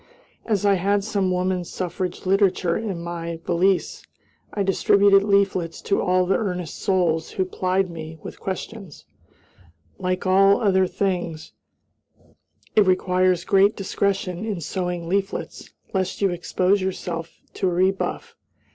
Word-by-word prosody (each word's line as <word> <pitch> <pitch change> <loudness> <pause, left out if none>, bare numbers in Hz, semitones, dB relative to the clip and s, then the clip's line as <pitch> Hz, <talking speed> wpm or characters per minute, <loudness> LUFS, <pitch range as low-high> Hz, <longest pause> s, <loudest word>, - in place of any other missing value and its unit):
As 205 -3 +1
I 200 - +5
had 200 +1 +2
some 200 -3 0
woman 180 0 0
suffrage 180 +1 -4
literature 190 -3 +2
in 195 -6 -3
my 170 -1 -5
valise, 180 +2 +1 0.5
I 200 - -1
distributed 195 +1 +4
leaflets 195 -4 +1
to 200 - +1
all 185 0 +2
earnest 180 -6 -3
souls 170 -4 0
who 190 - 0
plied 185 +1 0
me 160 -1 -8
with - - -9
questions. 195 -2 -6 0.9
Like 185 0 -2
all 195 +2 +5
other 190 -3 +3
things, 175 -5 -3 1.2
it 210 -3 +5
requires 185 -1 +2
great 195 +2 +4
discretion 195 -1 -2
in 210 -5 -3
sowing 175 0 -3
leaflets, 195 +2 -3 0.2
lest 190 -1 -1
you 195 -2 +2
expose 185 +3 +1
yourself 170 -3 -4
to 190 - 0
a - - -2
rebuff. 190 - -1
185 Hz, 130 wpm, -23 LUFS, 180-195 Hz, 1.2 s, I